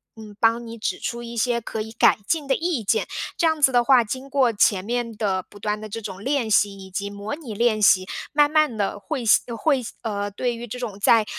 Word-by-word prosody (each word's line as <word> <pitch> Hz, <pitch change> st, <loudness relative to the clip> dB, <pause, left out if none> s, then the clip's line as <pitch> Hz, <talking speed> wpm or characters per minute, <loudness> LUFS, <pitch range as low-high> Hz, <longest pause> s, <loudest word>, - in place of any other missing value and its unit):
嗯， 215 Hz, -2 st, -11 dB
帮 230 Hz, +1 st, +2 dB
你 230 Hz, 0 st, -8 dB
指 195 Hz, -4 st, -3 dB
出 235 Hz, 0 st, -4 dB
一 235 Hz, 0 st, -8 dB
些 235 Hz, +1 st, +1 dB
可 220 Hz, -1 st, -5 dB
以 220 Hz, -, -7 dB
改 225 Hz, -, +4 dB
进 315 Hz, -4 st, 0 dB
的 270 Hz, -, +3 dB
意 325 Hz, -9 st, -1 dB
见。 -, -, +1 dB, 0.3 s
这 335 Hz, -, +2 dB
样 315 Hz, -1 st, +1 dB
子 270 Hz, -2 st, +5 dB
的 245 Hz, -1 st, +4 dB
话， 250 Hz, -2 st, +5 dB
经 260 Hz, +5 st, -6 dB
过 260 Hz, -5 st, +2 dB
前 200 Hz, -2 st, +2 dB
面 240 Hz, 0 st, -2 dB
的 195 Hz, -4 st, 0 dB
不 -, -, -14 dB
断 210 Hz, +1 st, -2 dB
的 215 Hz, -, -7 dB
这 225 Hz, -, -5 dB
种 195 Hz, -1 st, -7 dB
练 265 Hz, -5 st, 0 dB
习 205 Hz, -1 st, +3 dB
以 190 Hz, -1 st, -11 dB
及 200 Hz, +2 st, -3 dB
模 205 Hz, +5 st, -6 dB
拟 265 Hz, -10 st, -8 dB
练 220 Hz, -1 st, +2 dB
习， 185 Hz, -2 st, +5 dB, 0.2 s
慢 295 Hz, 0 st, +3 dB
慢 305 Hz, -7 st, +2 dB
地 205 Hz, 0 st, -2 dB
会 260 Hz, +2 st, -4 dB
吸 215 Hz, -, +5 dB
呃， 235 Hz, -2 st, -5 dB
会 275 Hz, 0 st, +2 dB, 0.2 s
呃， 205 Hz, -2 st, -2 dB
对 240 Hz, +4 st, -2 dB
于 240 Hz, +1 st, -7 dB
这 250 Hz, -, -6 dB
种 215 Hz, -5 st, -6 dB
在， 225 Hz, +1 st, +4 dB
230 Hz, 265 characters per minute, -23 LUFS, 205-255 Hz, 0.3 s, 子